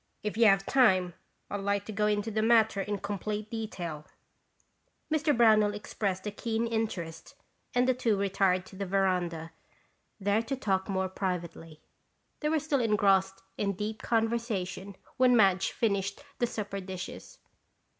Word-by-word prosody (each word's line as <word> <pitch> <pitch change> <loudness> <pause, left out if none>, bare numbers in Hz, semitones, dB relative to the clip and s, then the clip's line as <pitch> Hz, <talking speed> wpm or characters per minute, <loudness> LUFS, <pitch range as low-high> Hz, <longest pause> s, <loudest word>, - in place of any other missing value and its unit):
If 210 -1 -2
you 230 0 +5
have 195 -1 +4
the - - -6
time, 190 -9 +4 0.4
I'd 205 - -2
like 200 0 -1
to 215 - -6
go 210 0 +1
into 210 +1 0
the 215 +1 0
matter 220 -2 +4
in 205 +1 -2
complete 210 +2 -4
detail." 175 -9 -5 1.1
Mr. 300 -3 +2
Brownell 215 -3 +5
expressed 200 -2 -3
a 210 - -2
keen 225 +2 -2
interest 220 -8 -4 0.4
and 250 +1 +3
the 255 - +4
two 235 -4 +1
retired 190 -2 +1
to - - -13
the 195 0 -4
veranda, 180 -4 0 0.7
there 205 +2 +2
to 265 +4 -3
talk 195 -6 -1
more 190 -1 0
privately. 170 -4 -5 0.6
They 300 - 0
were 315 - +2
still 295 -3 0
engrossed 195 -3 +2 0.2
in 200 -1 0
deep 210 +3 -4
conversation 220 -5 -1 0.2
when 250 -2 +5
Madge 195 -3 +4
finished 200 0 -1 0.2
the 240 - +2
supper 205 -3 -4
dishes. 185 -1 -8
205 Hz, 155 wpm, -29 LUFS, 190-225 Hz, 1.1 s, you